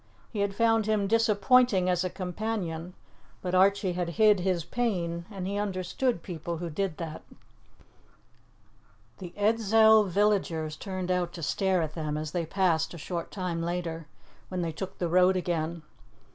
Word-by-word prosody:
He 210 - -3
had 200 -1 0
found 225 -1 +2
him 215 -2 +1
disappointing 220 -1 +3
as 180 -1 +1
a 185 - -1
companion, 180 -2 -4 0.4
but 180 -1 -4
Archie 190 0 +3
had 175 -1 -2
hid 215 -3 +5
his 180 -2 0
pain, 175 -8 -2
and 195 -4 -6
he 200 +2 -2
understood 195 +2 -1
people 170 -1 -5
who 170 0 -5
did 180 0 -2
that. 160 -2 -6 2.0
The 180 -2 -7
Edzell 220 0 +5
villagers 175 -5 +1
turned 185 +1 -4
out 180 -1 0
to 165 - -7
stare 185 +3 +1
at 155 -1 -4
them 155 -2 -3
as 155 0 -4
they 170 -1 -2
passed 170 -3 +1
a - - -8
short 170 +2 -5
time 180 -4 -3
later, 165 -2 -3 0.4
when 185 -1 -2
they 165 - -2
took 185 +4 -7
the 175 - -1
road 180 +2 +4
again. 170 -2 -2
185 Hz, 160 wpm, -28 LUFS, 170-205 Hz, 2.0 s, hid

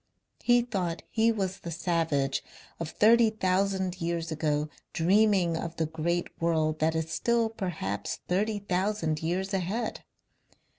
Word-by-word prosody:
He 240 0 +4
thought 185 -8 -3
he 225 0 +3
was 195 -3 -2
the 170 - -7
savage 165 -5 0 0.4
of 165 -2 -3
thirty 225 +5 +5
thousand 190 -2 0
years 170 -1 -2
ago 150 -1 0 0.3
dreaming 190 -1 +3
of 165 0 -4
the 165 - 0
great 165 +2 -1
world 160 -2 +1
that 160 +1 +2
is 160 0 -2
still 230 +7 +1
perhaps 175 - -3
thirty 205 +4 +1
thousand 185 -5 -1
years 185 +4 -1
ahead. 195 +5 -2
180 Hz, 135 wpm, -28 LUFS, 160-205 Hz, 0.4 s, thirty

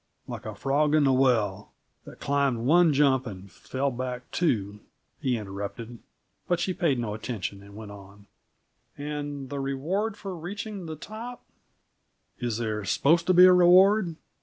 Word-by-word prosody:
"Like - - -7
the - - -6
frog 145 +2 +1
in 155 - +4
the 135 -1 +4
well 120 -7 +1 0.3
that - - -12
climbed 140 -5 0
one 170 +3 +5
jump 135 -3 +3
and 95 -2 -9
fell 135 +1 -3
back 125 0 -5
two!" 105 - -1 0.4
he 125 -3 0
interrupted, 105 +3 -7 0.5
but 175 -1 +1
she 185 +2 -1
paid 160 -7 +1
no 115 -3 -3
attention, 105 -3 -5
and 100 0 -14
went 105 -1 -9
on. 100 0 -14 0.7
"And 145 -2 -5
the 140 - -3
reward 170 +11 -2
for 195 -3 -6
reaching 195 +2 -6
the 160 - -5
top 225 +9 -9 0.5
" - - -46
"Is 120 -3 -2
there 110 -2 -2
supposed 165 - +2
to 185 - +4
be 180 +1 +9
a 185 - +8
reward?" 180 +1 +5
135 Hz, 160 wpm, -27 LUFS, 110-170 Hz, 0.7 s, be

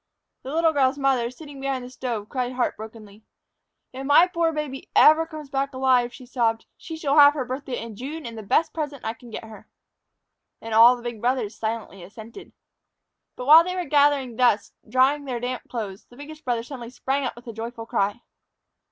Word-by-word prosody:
The 265 - -7
little 325 +1 +2
girl's 270 -1 +2
mother, 265 -4 +1
sitting 280 +1 -11
behind 270 -2 -2
the - - -9
stove, 235 -5 -4
cried 255 0 -3
heartbrokenly. 220 -4 -5 0.7
"If 265 +1 -6
my 290 +5 +6
poor 335 -2 0
baby 300 -4 -5
ever 320 +2 +6
comes 305 -4 -10
back 275 0 -2
alive," 255 -2 +2
she 255 - -12
sobbed, 230 -3 -1
"she 320 -1 -8
shall 295 -2 +2
have 290 0 +8
her 265 -4 -2
birthday 255 0 -5
in 230 -2 -8
June 290 +8 -7
and 230 -1 -7
the 220 - -7
best 215 +10 +1
present 295 -4 -5
I 225 - -2
can 235 +1 -15
get 225 - -7
her." 220 -1 -13 0.9
And 225 0 -7
all 230 +3 +8
the 240 - -12
big 235 -3 -6
brothers 240 -4 -1
silently 220 -3 -5
assented. 220 - -12 0.8
But 250 - -7
while 315 +4 +9
they 365 +1 -4
were 360 -1 -2
gathered 285 -4 +2
thus, 240 -5 +2 0.2
drying 265 +4 +2
their 250 -3 -3
damp 250 +1 -5
clothes, 210 -5 -6
the 245 - -19
biggest 305 +2 -11
brother 240 -2 -1
suddenly 240 -2 -8
sprang 270 +2 -2
up 255 - -3
with 240 - -14
a 230 - -7
joyful 225 +1 -7
cry. 205 +1 -1
255 Hz, 195 wpm, -24 LUFS, 230-285 Hz, 0.9 s, while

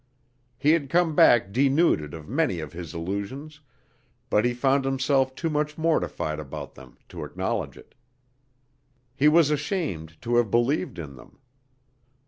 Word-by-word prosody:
He 150 +2 +3
had 155 -4 +1
come 170 0 +2
back 115 -8 +5
denuded 135 - +2
of 80 -2 -10
many 140 - 0
of 75 0 -7
his 85 0 -8
illusions, 100 - -5 0.7
but 105 +2 +3
he 120 - +2
found 135 +2 +2
himself 135 0 +1
too 165 - -2
much 150 0 -1
mortified 155 - -1
about 75 -3 -7
them - - -15
to - - -7
acknowledge - - -3
it. - - -17 1.2
He 140 +2 +3
was 155 -1 +5
ashamed 145 - -3
to 120 +1 +1
have 120 -3 +2
believed 120 +7 0
in 75 -5 -7
them. - - -16
130 Hz, 145 wpm, -25 LUFS, 90-150 Hz, 1.2 s, back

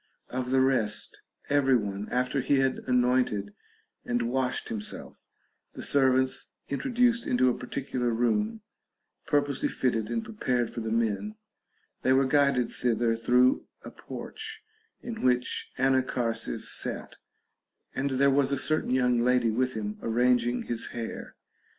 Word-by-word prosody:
Of 125 0 -3
the 130 0 +3
rest 125 -6 0 0.3
every 140 -2 +3
one, 100 -2 -4
after 125 +2 0
he 140 - +2
had 135 -1 +1
anointed 125 -5 +1 0.5
and 120 0 -1
washed 125 +1 -1
himself, 105 -2 -6 0.5
the - - -7
servants 130 -2 +2 0.2
introduced 240 - +1
into 125 +1 +3
a - - -3
particular 125 -1 -3
room, 210 - 0 0.7
purposely 145 -2 +1
fitted 115 -4 -1
and 230 -1 -2
prepared 125 - -1
for 120 - -4
the 110 -1 -3
men; 115 - -1 0.7
they 130 - +3
were 135 +1 +4
guided 140 -3 +3
thither 115 -1 +1
through 125 +3 +3 0.2
a - - -8
porch, 440 0 -8 0.4
in 235 -2 -6
which 125 -1 0
Anacharsis 130 -3 0
sat, - - -4 0.8
and 135 +1 -1
there 140 +1 +3
was 140 0 +2
a 140 - +1
certain 155 +4 0
young 125 -1 +2
lady 120 -1 +3
with 130 +3 0
him 105 -1 -4
arranging 120 +1 +2
his 120 -1 -3
hair. 115 -1 -6
125 Hz, 135 wpm, -28 LUFS, 120-135 Hz, 0.8 s, were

